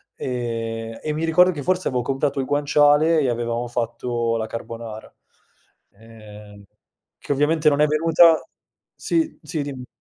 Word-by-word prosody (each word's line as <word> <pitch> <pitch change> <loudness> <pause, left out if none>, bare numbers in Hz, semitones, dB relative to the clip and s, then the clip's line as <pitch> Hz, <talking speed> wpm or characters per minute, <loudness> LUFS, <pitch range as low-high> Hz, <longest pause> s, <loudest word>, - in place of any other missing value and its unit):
Ehm, 115 -2 -4
e 150 - -3
mi 155 +2 -3
ricordo 180 +3 +4
che 145 -5 -6
forse 185 +2 0
avevo 125 -2 -1
comprato 135 +1 -1
il 130 - -1
guanciale 145 +3 +3
e 135 -4 +1
avevamo 120 0 -2
fatto 120 0 -2
la 110 -1 -2
carbonara, 115 -1 -8 0.8
ehm, 105 -1 -14 0.5
che - - -7
ovviamente 150 +2 +2
non 145 0 0
è 150 - +5
venuta 165 +2 +4 0.5
sì, 325 -2 -1
sì 155 -1 -4
dimmi. 135 -3 -7
130 Hz, 145 wpm, -22 LUFS, 115-150 Hz, 0.8 s, è